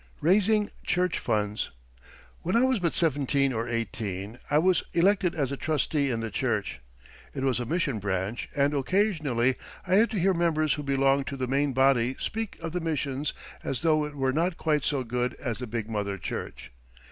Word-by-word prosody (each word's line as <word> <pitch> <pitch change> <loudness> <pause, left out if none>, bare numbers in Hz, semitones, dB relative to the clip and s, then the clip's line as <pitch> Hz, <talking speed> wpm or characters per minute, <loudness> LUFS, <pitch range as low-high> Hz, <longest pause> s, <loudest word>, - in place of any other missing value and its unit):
RAISING 210 +5 +3
CHURCH 180 0 +1
FUNDS 105 -2 -1 0.7
When 180 - -1
I 235 - +5
was 260 -3 +2
but 170 -3 0
seventeen 140 -3 +2
or 115 +1 -2
eighteen 110 -2 -3
I 145 - +3
was 180 +3 +4
elected 185 0 +3
as 140 -4 -1
a 140 - -3
trustee 150 -1 0
in 115 -2 -1
the 115 -1 -4
church. - - -1 0.6
It 135 - -3
was 130 -3 +1
a 120 - -3
mission 145 -7 0
branch, 100 +3 -2
and 140 0 +2
occasionally 145 - +1 0.3
I 185 +1 +3
had 225 +3 +5
to 215 - -2
hear 190 +2 +3
members 155 -3 +2
who 150 - -3
belonged 135 -1 +2
to 140 - -4
the 130 - -1
main 140 +2 +1
body 130 -1 +3
speak 225 -2 -4
of 165 - -3
the 180 +1 -2
mission 145 -3 -2 0.4
as 135 - -2
though 155 -2 +3
it 150 0 -5
were 135 -2 0
not 165 +3 0
quite 150 -3 +1
so 140 -3 0
good 125 +1 -1
as 120 -4 -4
the 125 - -5
big 115 -1 -3
mother 100 -3 -2
church. - - -6
140 Hz, 190 wpm, -27 LUFS, 120-170 Hz, 0.7 s, I